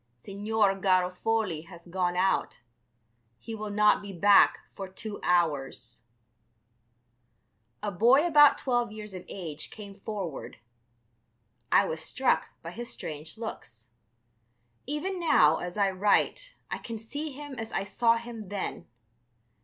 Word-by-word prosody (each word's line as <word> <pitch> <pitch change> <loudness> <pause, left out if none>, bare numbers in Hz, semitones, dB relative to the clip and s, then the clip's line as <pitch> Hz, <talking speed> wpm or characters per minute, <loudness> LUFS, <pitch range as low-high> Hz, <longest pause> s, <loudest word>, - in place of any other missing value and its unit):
"Signor 205 - 0
Garofoli 185 -1 +1
has 170 -3 -13
gone 180 0 -1
out; 190 -8 0 0.8
he 225 - -8
will 215 -1 -5
not 210 +1 +4
be 200 -1 -8
back 200 +2 +5
for 195 -1 -7
two 205 +2 -7
hours." 145 -9 0 1.8
A 205 - -1
boy 240 - +5
about 295 -4 +7
twelve 240 -4 0
years 215 -1 -8
of 185 -1 -7
age 165 -6 -6
came 205 -2 -10
forward. 195 -8 -6 1.1
I - - +5
was 160 - -3
struck 260 +8 +1 0.2
by 165 - -6
his 235 +5 -6
strange 155 +3 -7
looks. 120 - -8 1.0
Even 345 +7 -3
now, 160 - +5
as 180 +2 -6
I 200 -2 +3
write, 210 - +1 0.2
I - - -2
can 230 -1 -6
see 285 +8 -5
him 290 0 -9
as 225 0 -5
I - - -1
saw 230 +4 +2
him 230 -4 -8
then. 200 -1 -4
205 Hz, 130 wpm, -28 LUFS, 180-230 Hz, 1.8 s, about